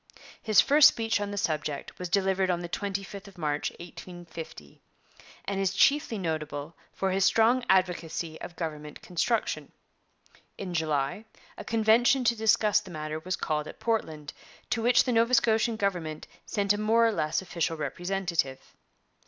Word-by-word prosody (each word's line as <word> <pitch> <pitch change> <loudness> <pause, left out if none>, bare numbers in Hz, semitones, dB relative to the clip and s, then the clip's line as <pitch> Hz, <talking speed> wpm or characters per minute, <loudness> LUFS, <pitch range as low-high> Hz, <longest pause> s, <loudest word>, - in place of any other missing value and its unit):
His 215 -3 +5
first 295 +1 +7
speech 225 -2 0
on 205 - -2
the 205 - -5
subject 150 -5 -3
was 180 -1 -4
delivered 190 0 +1
on 175 -1 0
the 175 - -5
25th 200 +2 -5
of 195 -2 -15
March 150 -3 -1
1850, 170 - -10 0.6
and 200 -1 -2
is 195 0 0
chiefly 275 -1 +3
notable 155 -3 -4 0.2
for 190 -1 -2
his 190 +1 +1
strong 230 +5 +4
advocacy 170 -3 0
of 170 - -8
government 150 -3 -6
construction. 215 +6 -1 0.9
In 185 -3 -5
July 155 +3 -1 0.3
a - - -8
convention 230 +4 +3
to 235 0 +3
discuss 215 -1 +3
the - - -12
matter 155 -1 -5
was 180 +3 -3
called 150 -1 -2
at - - -10
Portland, 155 -11 -2 0.4
to 230 - 0
which 240 +1 +4
the 255 - -1
Nova 235 +2 +3
Scotian 225 0 +2
government 175 -7 -2 0.2
sent 200 -1 +1
a 205 - -3
more 225 +2 +3
or 225 - +3
less 155 -3 -1
official 170 -2 -2
representative. 175 -4 -3
190 Hz, 155 wpm, -28 LUFS, 160-220 Hz, 0.9 s, first